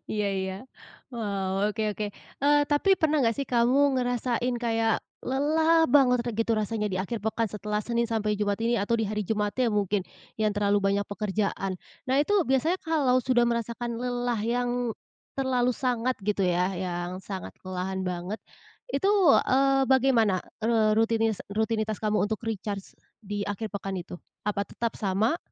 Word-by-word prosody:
iya 210 -1 0
iya. 190 0 -3 0.6
Wah, 200 -3 -1
oke 220 +1 -2
oke. 210 - -4 0.4
Eee, 290 0 +5
tapi 290 +7 +3
pernah 310 -1 +3
nggak 230 -1 +2
sih 275 - -1
kamu 245 +2 +3 0.2
ngerasain 245 0 0
kayak 225 -1 +2 0.3
lelah 315 +5 +3
banget 265 -4 +5
atau 240 - -2
gitu 230 0 +1
rasanya 215 0 -1
di - - -1
akhir 225 +5 -3
pekan 220 0 0
setelah 210 0 -3
Senin 235 0 0
sampai 215 -2 0
Jumat 205 -1 0
ini, 235 +1 +2
atau 205 +4 0
di - - +1
hari 210 0 -1
Jumatnya 215 +4 0
mungkin 205 -1 +1 0.4
yang 215 -1 +2
terlalu 205 0 +2
banyak 200 +1 +1
pekerjaan. 200 -2 -2 0.4
Nah, 260 - +2
itu 300 - 0 0.2
biasanya 310 +8 +2
kalau 295 -6 +2
sudah 245 -2 +3
merasakan 235 0 -2
lelah 245 -2 -1
yang 245 +2 0 0.7
terlalu 250 -2 +1
sangat 250 -1 0
gitu 205 -2 +1
ya, 180 +1 +1
yang 175 0 -3
sangat 190 -1 -6
kelelahan 185 +1 -3
banget, 180 +3 -4 0.5
itu, 390 - +1 0.4
eee, 270 +1 +3
bagaimana, 240 -8 +3 0.2
eee, 225 -2 +3
rutinis 225 -1 +2
rutinitas 220 0 0
kamu 215 -1 +1
untuk 220 -1 -3
recharge 205 -3 -4 0.3
di 205 -1 -4
akhir 215 +2 -3
pekan 195 -1 -4
itu? 175 - -8 0.3
Apa 200 -1 -1
tetap 230 -1 -3
sama? 210 - +1
220 Hz, 160 wpm, -27 LUFS, 205-245 Hz, 0.7 s, Eee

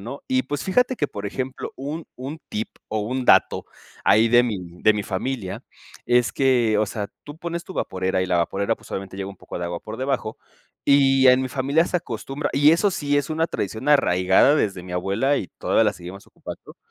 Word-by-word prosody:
¿no? 120 +8 -8
Y, 260 -1 +1
pues, 145 - -4
fíjate 250 +6 +2
que, 145 - 0
por 100 -5 -8
ejemplo, 130 +5 -5
un 150 +5 -5
un 135 +5 -6
tip 110 +2 -3 0.2
o 110 - -2
un 125 +5 -2
dato, - - +4 0.4
ahí 110 +2 +5
de 120 +1 +6
mi 115 -4 -1 0.3
de 110 - +6
mi 105 0 -2
familia, 100 +1 -4 0.4
es 120 -1 +3
que, 120 -5 +2
o 110 - +2
sea, 105 0 -4
tú 145 +1 -10
pones 170 0 -4
tu 190 - -10
vaporera, 95 0 -1
y - - -2
la 90 -1 +1
vaporera, 95 +4 0
pues, - - -18
obviamente 95 0 -5
llega 95 0 -4
un 100 - -10
poco - - -8
de 85 - -3
agua 85 0 -4
por 110 +1 -8
debajo, 130 -4 -2 0.5
y 135 -1 +5
en 125 +1 +6
mi 130 - -2
familia 140 +5 +1
se 180 - -1
acostumbra 135 +1 -4
Y 145 +2 +5
eso 200 +5 +3
sí 145 -5 0
es 145 - -2
una 160 +1 +1
tradición 110 - -4
arraigada 95 -3 +4
desde 95 -11 0
mi 90 - -9
abuela, 100 +10 +1
y 95 - -3
todavía 115 - +2
la 105 - +2
seguimos 90 +1 -10
ocupando. - - -11
125 Hz, 215 wpm, -23 LUFS, 100-145 Hz, 0.5 s, de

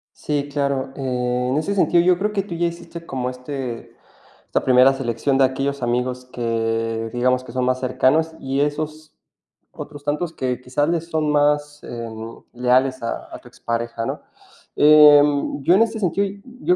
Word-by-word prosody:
Sí, 145 -1 -2
claro. 140 -2 -1
En 125 0 -1
ese 160 +6 -1
sentido, 175 -3 +3
yo 180 -1 +4
creo 210 +2 -1
que 200 -2 0
tú 185 -3 -7
ya 170 +1 0
hiciste 170 0 -7
como 125 -1 -3
este, 125 -2 -6 0.5
esta - - -1
primera 130 +1 +5
selección 135 +1 -1
de 135 - +4
aquellos 135 +1 -1
amigos 125 +1 -1
que, 115 -2 -2
digamos, 125 +1 +1
que 130 - -11
son 125 +1 -1
más 130 0 +1
cercanos 140 +5 +1
y 135 +1 -1
esos 155 +1 -3 0.6
otros 145 -1 -9
tantos 150 +3 -2
que 125 -4 -2
quizás 130 +4 -1
les 165 0 -2
son 155 -2 0
más, 145 0 +1
eh, 115 -1 -6 0.4
leales 130 +2 +1
a 115 - -4
a - - -9
tu - - -17
expareja, 115 0 -4
¿no? - - -4 0.5
Eh, 150 -1 +8 0.4
yo 165 +5 +4
en 210 - +4
este 225 -1 +1
sentido, 200 +1 0 0.3
yo 360 - +3
135 Hz, 170 wpm, -21 LUFS, 125-155 Hz, 0.6 s, Eh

